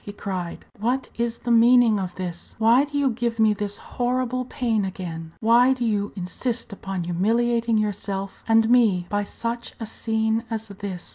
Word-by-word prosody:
he 205 - -7
cried, 185 -4 -5
"what 245 +5 0
is 235 0 -1
the 240 - -3
meaning 235 -2 +6
of 185 -2 -4
this? 175 -2 -6
Why 230 +5 +5
do 290 0 -4
you 280 -2 +2
give 235 0 -2
me 220 -1 +4
this 205 0 -3
horrible 255 0 -2
pain 230 -4 0
again? 170 -4 -5
Why 240 +4 +5
do 245 -2 -3
you 205 -2 0
insist 215 +5 -3
upon 195 -2 -4
humiliating 230 +6 +1
yourself 200 -2 -3
and 225 0 +4
me 225 -7 +4
by 205 0 0
such 235 +3 -5
a 225 - -4
scene 220 0 -1
as 220 -1 -4
this?" 195 -2 -6
220 Hz, 170 wpm, -24 LUFS, 200-235 Hz, -, meaning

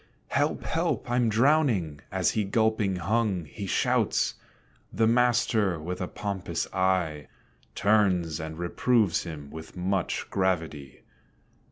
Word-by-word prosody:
"Help! - - 0
help! - - -1
I'm 120 -2 +2
drowning!" 115 - +2
as 95 -1 +1
he 110 - 0
gulping 110 -1 +1
hung, 95 0 0
He 95 +7 -7
shouts. 85 - +1 0.6
The 110 +3 +2
master, 115 -6 +2
with 90 +4 -5
a 90 - -2
pompous 100 -2 -3
eye, 90 -6 0 0.5
Turns 95 -6 +2
and 80 0 -6
reproves 100 +3 +1
him 75 -4 -8
with 80 +2 -10
much 95 +1 -1
gravity. 80 -8 -2
95 Hz, 120 wpm, -27 LUFS, 85-110 Hz, 0.6 s, I'm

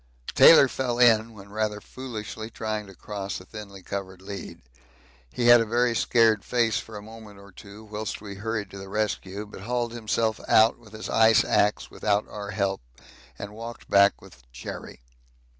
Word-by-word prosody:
Taylor 150 -4 +8
fell 125 -2 -2
in 115 -2 +5
when 100 -1 -13
rather 105 0 -2
foolishly 110 -3 -7
trying 110 -2 -4
to 95 - -13
cross 100 +1 -5
a 90 - -14
thinly 100 -2 -10
covered 95 -1 -6
lead 100 -6 -8 0.7
he 120 - -2
had 120 0 +8
a - - +2
very 120 +1 +1
scared 110 -3 +3
face 115 -3 +1
for 110 -1 -9
a 105 - -9
moment 110 -2 -12
or 100 0 -15
two 100 +3 -13
whilst 110 0 -5
we 100 -1 -8
hurried 105 -1 -4
to 100 - -9
the 95 0 -9
rescue, 105 -1 -2
but 105 -2 -11
hauled 120 +2 -2
himself 110 -1 -1
out 110 +2 +5
with 110 -3 -18
his 110 - -7
ice 110 +1 +5
axe 105 +1 +1
without 105 0 0
our 105 -1 -7
help 100 -1 -1 0.6
and 100 0 -7
walked 115 +2 -9
back 100 0 +5
with 95 -7 -16
Cherry. - - -8
105 Hz, 175 wpm, -26 LUFS, 100-115 Hz, 0.7 s, Taylor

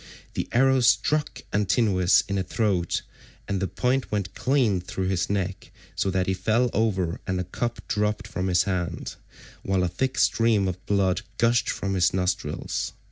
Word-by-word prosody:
The - - -3
arrow 130 +2 +4
struck 145 +4 +2
Antinous 100 -2 +3
in 100 - -1
the 95 - 0
throat, 95 -3 0 0.4
and 100 -2 -1
the 95 - 0
point 130 +4 -1
went 100 -3 -2
clean 125 -9 +1
through 95 +1 -3
his 95 -2 0
neck, 95 -2 -2 0.3
so 95 - 0
that 95 -1 0
he 95 - 0
fell 115 +5 +1
over 95 -6 0
and 95 -1 0
the 90 - -1
cup 120 +6 -4
dropped 105 +1 -1
from 95 -4 -3
his 90 -1 +3
hand, 90 -3 -3 0.5
while 95 -1 0
a - - +2
thick 130 +9 -2
stream 115 -4 +3
of 95 0 -4
blood 95 -3 +2 0.2
gushed 115 0 +2
from 100 0 -2
his 90 -1 +2
nostrils. 90 0 -2
100 Hz, 170 wpm, -25 LUFS, 90-115 Hz, 0.5 s, arrow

